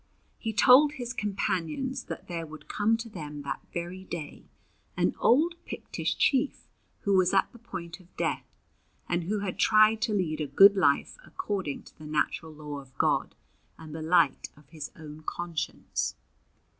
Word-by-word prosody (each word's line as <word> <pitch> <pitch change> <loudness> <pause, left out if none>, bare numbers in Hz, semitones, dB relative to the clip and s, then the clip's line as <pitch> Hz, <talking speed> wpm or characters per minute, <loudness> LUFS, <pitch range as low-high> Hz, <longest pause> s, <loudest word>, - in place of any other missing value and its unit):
He 225 - -2
told 265 +6 +7
his 245 -4 -5
companions 205 - -2
that - - -7
there 165 -2 -4
would 155 0 -11
come 220 +2 +2
to 230 0 -6
them 150 -8 -7
that 140 - -4
very 175 +2 -5
day 170 -5 -7 0.5
an - - +2
old 310 +8 +4
Pictish - - -3
chief 275 +1 +1 0.3
who 200 - +1
was 185 0 +4
at 195 - +3
the 235 - -15
point 180 -6 -7
of 180 -1 -22
death, - - -1 0.6
and 175 -1 0
who 205 +3 -1
had 190 -3 -4
tried 215 0 +5
to 225 -2 0
lead 160 -6 -1
a 150 - -1
good 195 +9 +8
life 145 - +2
according 190 - -4
to - - -18
the 155 - -9
natural 155 +2 -1
law 150 -1 -7
of 130 -2 -16
God - - +1 0.4
and 155 -2 -10
the 160 - -5
light 160 -3 +3
of 150 -1 -19
his 155 -2 -7
own 155 -1 -10
conscience. 170 0 -3
180 Hz, 170 wpm, -28 LUFS, 155-215 Hz, 0.6 s, good